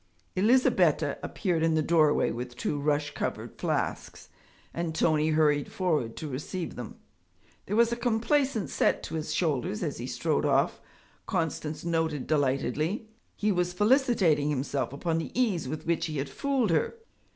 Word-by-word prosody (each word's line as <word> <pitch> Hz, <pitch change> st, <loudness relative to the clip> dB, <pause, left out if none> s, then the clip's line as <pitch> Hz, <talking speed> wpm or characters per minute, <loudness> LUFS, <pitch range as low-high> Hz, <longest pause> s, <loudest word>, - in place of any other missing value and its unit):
Elizabetta 235 Hz, +7 st, +3 dB
appeared 175 Hz, -6 st, -1 dB
in 165 Hz, 0 st, +2 dB
the 155 Hz, -, +2 dB
doorway 155 Hz, -2 st, +3 dB
with 120 Hz, +1 st, -6 dB
two 145 Hz, +3 st, -2 dB
rush 150 Hz, 0 st, 0 dB
covered -, -, -4 dB
flasks, -, -, -3 dB, 0.4 s
and 165 Hz, -1 st, -3 dB
Tony 155 Hz, -1 st, +2 dB
hurried 150 Hz, -2 st, +2 dB
forward 155 Hz, -11 st, 0 dB
to 155 Hz, -, -5 dB
receive 150 Hz, +6 st, -4 dB
them. 120 Hz, -3 st, -7 dB, 0.7 s
There 205 Hz, -, -1 dB
was 235 Hz, +1 st, +4 dB
a -, -, +1 dB
complaisant 240 Hz, 0 st, +1 dB
set -, -, +1 dB
to -, -, -7 dB
his 155 Hz, -1 st, -3 dB
shoulders 145 Hz, -, 0 dB
as -, -, -3 dB
he -, -, -4 dB
strode -, -, 0 dB
off, -, -, +2 dB, 0.5 s
Constance 160 Hz, -1 st, -2 dB
noted 160 Hz, -4 st, 0 dB
delightedly; 150 Hz, -, 0 dB, 0.3 s
he 210 Hz, 0 st, +1 dB
was 180 Hz, -1 st, 0 dB
felicitating 210 Hz, -, +3 dB
himself 135 Hz, -3 st, -1 dB
upon 165 Hz, +4 st, -1 dB
the 165 Hz, -, -5 dB
ease 195 Hz, -, +1 dB
with 155 Hz, +4 st, -5 dB
which 165 Hz, 0 st, 0 dB
he 155 Hz, -2 st, -4 dB
had 135 Hz, -, -2 dB
fooled 270 Hz, -8 st, 0 dB
her. 160 Hz, -, +1 dB
160 Hz, 155 wpm, -28 LUFS, 150-190 Hz, 0.7 s, was